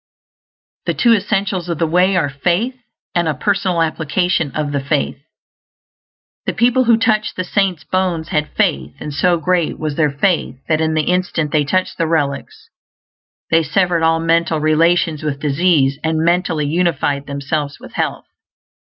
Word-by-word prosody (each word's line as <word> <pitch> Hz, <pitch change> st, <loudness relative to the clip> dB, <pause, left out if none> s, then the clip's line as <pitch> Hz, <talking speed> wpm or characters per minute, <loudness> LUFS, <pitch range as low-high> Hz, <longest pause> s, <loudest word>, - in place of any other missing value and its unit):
The -, -, 0 dB
two 235 Hz, -1 st, +4 dB
essentials 195 Hz, -3 st, -1 dB
of 170 Hz, -, -2 dB
the 165 Hz, -, +1 dB
Way 180 Hz, +4 st, +2 dB
are 165 Hz, -5 st, +2 dB
Faith, 175 Hz, -, -1 dB, 0.4 s
and 175 Hz, -1 st, +1 dB
a 155 Hz, -, 0 dB
Personal 185 Hz, +1 st, 0 dB
Application 160 Hz, 0 st, 0 dB
of 150 Hz, -2 st, -2 dB
the 140 Hz, -, 0 dB
Faith. 140 Hz, -1 st, -1 dB, 1.3 s
The -, -, -1 dB
people 245 Hz, +2 st, +3 dB
who 230 Hz, -1 st, +5 dB
touched 220 Hz, -1 st, +1 dB
the 185 Hz, -, -2 dB
saint's 185 Hz, -3 st, 0 dB
bones 180 Hz, -4 st, -1 dB
had 150 Hz, -3 st, 0 dB
faith; 70 Hz, +1 st, 0 dB
and 150 Hz, -, -6 dB
so 175 Hz, +4 st, +2 dB
great 175 Hz, 0 st, 0 dB
was 155 Hz, -2 st, -4 dB
their 155 Hz, -2 st, +3 dB
faith 145 Hz, -, 0 dB
that 155 Hz, -1 st, +1 dB
in 160 Hz, 0 st, 0 dB
the 155 Hz, -, +2 dB
instant 180 Hz, -4 st, -1 dB
they 150 Hz, -1 st, +2 dB
touched 185 Hz, +6 st, -1 dB
the 165 Hz, -, +1 dB
relics 165 Hz, -, -2 dB, 0.8 s
they 165 Hz, 0 st, +5 dB
SEVERED 175 Hz, +2 st, +1 dB
ALL 165 Hz, 0 st, +3 dB
MENTAL 165 Hz, -1 st, +1 dB
RELATIONS 160 Hz, +1 st, +2 dB
WITH 150 Hz, -3 st, -3 dB
DISEASE, 145 Hz, -2 st, +2 dB
AND 160 Hz, 0 st, 0 dB
MENTALLY 170 Hz, -3 st, +1 dB
UNIFIED 145 Hz, -3 st, 0 dB
THEMSELVES 140 Hz, +1 st, -3 dB
WITH -, -, -13 dB
HEALTH. -, -, -2 dB
165 Hz, 160 wpm, -18 LUFS, 150-185 Hz, 1.3 s, who